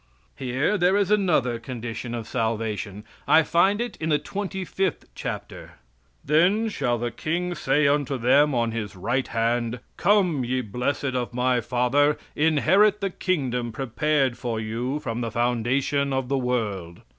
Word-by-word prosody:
Here 135 Hz, +10 st, 0 dB
there 180 Hz, +3 st, +4 dB
is 200 Hz, -1 st, +1 dB
another 155 Hz, -, +2 dB
condition 120 Hz, 0 st, -5 dB
of 115 Hz, -2 st, -5 dB
salvation. 110 Hz, -3 st, -2 dB, 0.2 s
I 160 Hz, -, +6 dB
find 190 Hz, +6 st, +3 dB
it 240 Hz, 0 st, -3 dB
in 160 Hz, -, -3 dB
the 150 Hz, -, +4 dB
25th 190 Hz, +1 st, -3 dB
chapter: -, -, -6 dB, 0.5 s
"Then 185 Hz, +10 st, +3 dB
shall 125 Hz, -, -1 dB
the 120 Hz, +1 st, -3 dB
King 175 Hz, +8 st, -2 dB
say 145 Hz, -2 st, +2 dB
unto 140 Hz, -1 st, +1 dB
them 140 Hz, +4 st, +4 dB
on 115 Hz, -1 st, +1 dB
His 110 Hz, -3 st, -4 dB
right 120 Hz, +8 st, -1 dB
hand, 115 Hz, +1 st, -1 dB, 0.2 s
'Come, 180 Hz, -8 st, +3 dB
ye 125 Hz, +1 st, -1 dB
blessed 125 Hz, +4 st, -2 dB
of 125 Hz, -1 st, -3 dB
my 125 Hz, 0 st, +2 dB
father, 125 Hz, +5 st, +2 dB, 0.2 s
inherit 165 Hz, +7 st, +4 dB
the 195 Hz, -2 st, -2 dB
kingdom 130 Hz, -11 st, -1 dB
prepared 135 Hz, +2 st, 0 dB
for 115 Hz, -3 st, -2 dB
you 120 Hz, +6 st, -3 dB
from 120 Hz, -4 st, -3 dB
the 115 Hz, -, -2 dB
foundation 125 Hz, +4 st, 0 dB
of 130 Hz, -1 st, -1 dB
the 140 Hz, -, +1 dB
world. 105 Hz, -9 st, -2 dB
130 Hz, 150 wpm, -25 LUFS, 120-155 Hz, 0.5 s, I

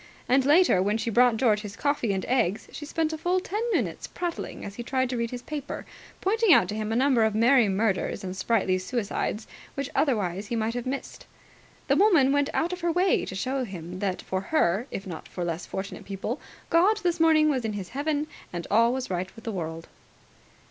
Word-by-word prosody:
And, 260 Hz, +2 st, +4 dB
later, 295 Hz, -, +5 dB
when 205 Hz, +3 st, +1 dB
she 230 Hz, +1 st, -2 dB
brought 240 Hz, 0 st, +4 dB
George 220 Hz, -4 st, +3 dB
his 205 Hz, -1 st, -8 dB
coffee 285 Hz, -6 st, 0 dB
and 190 Hz, -1 st, -2 dB
eggs, 215 Hz, -6 st, 0 dB
she 295 Hz, -, -7 dB
spent 320 Hz, 0 st, -1 dB
a 315 Hz, -, -5 dB
full 360 Hz, +3 st, +1 dB
ten 410 Hz, +4 st, -3 dB
minutes -, -, -1 dB
prattling 350 Hz, -1 st, -5 dB
as 200 Hz, -, -7 dB
he 240 Hz, -, -6 dB
tried 260 Hz, +1 st, -1 dB
to -, -, -1 dB
read 235 Hz, 0 st, -1 dB
his 245 Hz, 0 st, -7 dB
paper, 295 Hz, -2 st, -5 dB, 0.4 s
pointing 445 Hz, +1 st, +3 dB
out 180 Hz, -, +6 dB
to 210 Hz, -, -3 dB
him 215 Hz, 0 st, -3 dB
a -, -, 0 dB
number 255 Hz, -2 st, +3 dB
of 220 Hz, -1 st, +1 dB
merry 235 Hz, 0 st, +5 dB
murders 195 Hz, 0 st, 0 dB
and 185 Hz, 0 st, -4 dB
sprightly 190 Hz, -1 st, +1 dB
suicides 210 Hz, +1 st, -2 dB, 0.3 s
which 275 Hz, 0 st, -3 dB
otherwise 200 Hz, -, 0 dB
he 235 Hz, -, -2 dB
might 225 Hz, 0 st, 0 dB
have 245 Hz, 0 st, -4 dB
missed. 270 Hz, +1 st, -5 dB, 0.6 s
The -, -, +3 dB
woman 335 Hz, -11 st, +5 dB
went 285 Hz, +1 st, +2 dB
out 345 Hz, +3 st, 0 dB
of 360 Hz, -, -6 dB
her 340 Hz, 0 st, +1 dB
way 360 Hz, +3 st, +2 dB
to 190 Hz, -, -6 dB
show 260 Hz, +6 st, -1 dB
him 180 Hz, -4 st, -7 dB
that 190 Hz, -2 st, -2 dB
for 190 Hz, 0 st, -2 dB
her, 205 Hz, -, +1 dB
if 195 Hz, -, -6 dB
not 175 Hz, -4 st, -7 dB
for 180 Hz, -, -4 dB
less 170 Hz, 0 st, -4 dB
fortunate 195 Hz, +1 st, -6 dB
people, 200 Hz, +6 st, -4 dB, 0.3 s
God 400 Hz, +6 st, +4 dB
this 350 Hz, -2 st, +1 dB
morning 315 Hz, -1 st, +5 dB
was 265 Hz, -5 st, +1 dB
in 220 Hz, -1 st, -2 dB
His 195 Hz, -3 st, -5 dB
heaven 290 Hz, +3 st, -1 dB, 0.3 s
and 175 Hz, -1 st, -5 dB
all 230 Hz, +3 st, +5 dB
was 260 Hz, -5 st, -4 dB
right 180 Hz, +1 st, -2 dB
in 225 Hz, -, -11 dB
the 225 Hz, -, -3 dB
world. 165 Hz, -4 st, -5 dB
235 Hz, 215 wpm, -26 LUFS, 195-290 Hz, 0.6 s, out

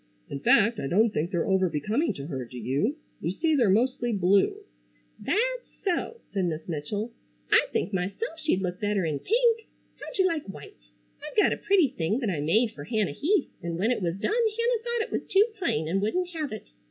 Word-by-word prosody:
In 140 Hz, -, -3 dB
fact, 215 Hz, +8 st, +4 dB
I -, -, -2 dB
don't 215 Hz, +8 st, +3 dB
think 155 Hz, +3 st, -1 dB
they're 175 Hz, -4 st, 0 dB
over 190 Hz, -2 st, +2 dB
becoming 215 Hz, -, 0 dB
to 140 Hz, -, -6 dB
her, 135 Hz, -5 st, -4 dB
do 125 Hz, +1 st, -10 dB
you? 140 Hz, -, 0 dB, 0.2 s
You 165 Hz, -, -2 dB
see 315 Hz, -, +1 dB
they're 240 Hz, -8 st, +3 dB
mostly 240 Hz, +3 st, +2 dB
blue——" 195 Hz, -1 st, +2 dB, 0.5 s
"That's -, -, 0 dB, 0.2 s
so!" 395 Hz, +5 st, -1 dB
said 195 Hz, -2 st, +1 dB
Miss 160 Hz, -2 st, -3 dB
Mitchell. 195 Hz, +8 st, -3 dB, 0.4 s
"I -, -, +5 dB
think 200 Hz, -, -1 dB
myself 200 Hz, -, -3 dB
she'd 305 Hz, -12 st, 0 dB
look 180 Hz, 0 st, -3 dB
better 205 Hz, -3 st, +1 dB
in 150 Hz, -3 st, -1 dB
pink. 460 Hz, 0 st, +2 dB, 0.3 s
How'd -, -, -8 dB
you 380 Hz, -, +4 dB
like 330 Hz, -, -1 dB
white? -, -, -13 dB, 0.3 s
I've -, -, -8 dB
got 420 Hz, -, +5 dB
a -, -, -4 dB
pretty 375 Hz, -8 st, +3 dB
thing 180 Hz, +1 st, -1 dB
that 235 Hz, -7 st, -1 dB
I 160 Hz, -, -2 dB
made 215 Hz, +10 st, +2 dB
fer -, -, -9 dB
Hannah 215 Hz, -7 st, 0 dB
Heath 320 Hz, -, +1 dB
an' 170 Hz, -1 st, -3 dB
when 215 Hz, +7 st, +1 dB
it 245 Hz, -, 0 dB
was 170 Hz, 0 st, -1 dB
done 200 Hz, -, -1 dB
Hannah 465 Hz, 0 st, +1 dB
thought 475 Hz, -1 st, 0 dB
it -, -, -15 dB
was -, -, -3 dB
too 395 Hz, +2 st, +6 dB
plain 160 Hz, -, 0 dB
and 190 Hz, +4 st, 0 dB
wouldn't 355 Hz, -, 0 dB
have 315 Hz, -5 st, -4 dB
it. 215 Hz, -2 st, -6 dB
215 Hz, 215 wpm, -27 LUFS, -, 0.5 s, too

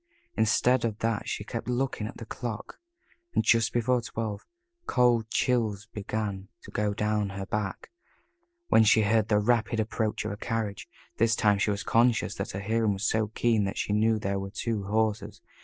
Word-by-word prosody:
Instead 115 Hz, +3 st, +3 dB
of 110 Hz, -3 st, -1 dB
that 115 Hz, -1 st, -1 dB
she -, -, -3 dB
kept 115 Hz, +3 st, -5 dB
looking 125 Hz, -3 st, -1 dB
at -, -, -9 dB
the 115 Hz, -, -8 dB
clock, 115 Hz, -1 st, -6 dB, 0.6 s
and -, -, +3 dB
just 115 Hz, 0 st, +3 dB
before 120 Hz, +1 st, +1 dB
twelve, 110 Hz, -3 st, -5 dB, 0.4 s
cold 120 Hz, -3 st, +3 dB
chills 110 Hz, -5 st, 0 dB
began 105 Hz, -2 st, -3 dB, 0.2 s
to -, -, -11 dB
go 105 Hz, 0 st, 0 dB
down 105 Hz, 0 st, 0 dB
her 95 Hz, 0 st, -5 dB
back, 105 Hz, -1 st, -4 dB, 0.8 s
when 110 Hz, -, +6 dB
she 110 Hz, +1 st, +5 dB
heard 110 Hz, 0 st, +2 dB
the 105 Hz, -, +3 dB
rapid 115 Hz, +1 st, +1 dB
approach 110 Hz, 0 st, -1 dB
of -, -, -2 dB
a 100 Hz, -, -5 dB
carriage 110 Hz, -3 st, -3 dB, 0.3 s
this 115 Hz, 0 st, +3 dB
time 105 Hz, -2 st, +3 dB
she 105 Hz, -, +1 dB
was 100 Hz, -1 st, -1 dB
conscious 120 Hz, 0 st, +2 dB
that -, -, -4 dB
her 95 Hz, -, -5 dB
hearing 110 Hz, 0 st, +1 dB
was 100 Hz, +3 st, -1 dB
so 110 Hz, -1 st, +1 dB
keen 110 Hz, 0 st, +1 dB
that 95 Hz, -, -4 dB
she 105 Hz, -, -1 dB
knew 110 Hz, +1 st, +3 dB
there 100 Hz, -2 st, -2 dB
were 95 Hz, 0 st, -5 dB
two 110 Hz, 0 st, -3 dB
horses. 110 Hz, +1 st, -1 dB
110 Hz, 185 wpm, -28 LUFS, 105-115 Hz, 0.8 s, when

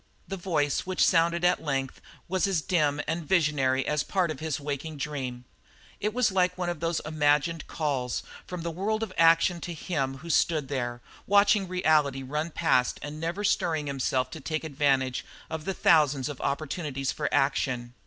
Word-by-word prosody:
The 195 Hz, -, -4 dB
voice 160 Hz, -5 st, -1 dB
which 185 Hz, -1 st, +3 dB
sounded 170 Hz, +1 st, +3 dB
at 180 Hz, -, +3 dB
length 135 Hz, -3 st, -2 dB, 0.3 s
was 190 Hz, +2 st, +1 dB
as 180 Hz, -5 st, 0 dB
dim 150 Hz, -5 st, +1 dB
and 165 Hz, +2 st, -2 dB
visionary 145 Hz, -6 st, +2 dB
as 150 Hz, -1 st, +1 dB
a -, -, -5 dB
part 185 Hz, -4 st, +1 dB
of 145 Hz, -, -6 dB
his 155 Hz, -2 st, -2 dB
waking 145 Hz, +2 st, -4 dB
dream. 130 Hz, -4 st, -4 dB, 0.5 s
It 210 Hz, +1 st, -1 dB
was 240 Hz, -2 st, +2 dB
like 180 Hz, -1 st, +1 dB
one 180 Hz, -1 st, -1 dB
of 175 Hz, -3 st, -3 dB
those 165 Hz, 0 st, -1 dB
imagined 150 Hz, +1 st, +1 dB
calls 135 Hz, -6 st, -2 dB, 0.2 s
from 180 Hz, -2 st, -5 dB
the 170 Hz, -, -2 dB
world 215 Hz, +6 st, -1 dB
of 205 Hz, -4 st, -5 dB
action 165 Hz, +1 st, +4 dB
to 175 Hz, -, -5 dB
him 135 Hz, -5 st, -2 dB
who 170 Hz, +4 st, -10 dB
stood 155 Hz, -4 st, +2 dB
there, 120 Hz, -3 st, -3 dB, 0.3 s
watching 200 Hz, 0 st, +4 dB
reality 155 Hz, -7 st, +2 dB
run 150 Hz, +5 st, -2 dB
past 155 Hz, -6 st, +1 dB
and 145 Hz, +2 st, -6 dB
never 170 Hz, +5 st, -3 dB
stirring 160 Hz, -6 st, +1 dB
himself 130 Hz, -2 st, -1 dB
to 160 Hz, -, -7 dB
take 155 Hz, +2 st, -3 dB
advantage 135 Hz, -4 st, +1 dB, 0.3 s
of 160 Hz, -1 st, -4 dB
the 195 Hz, -, -1 dB
thousand 150 Hz, -6 st, +3 dB
opportunities 140 Hz, -1 st, -2 dB
for -, -, -3 dB
action. 125 Hz, -3 st, 0 dB
155 Hz, 175 wpm, -27 LUFS, 140-175 Hz, 0.5 s, action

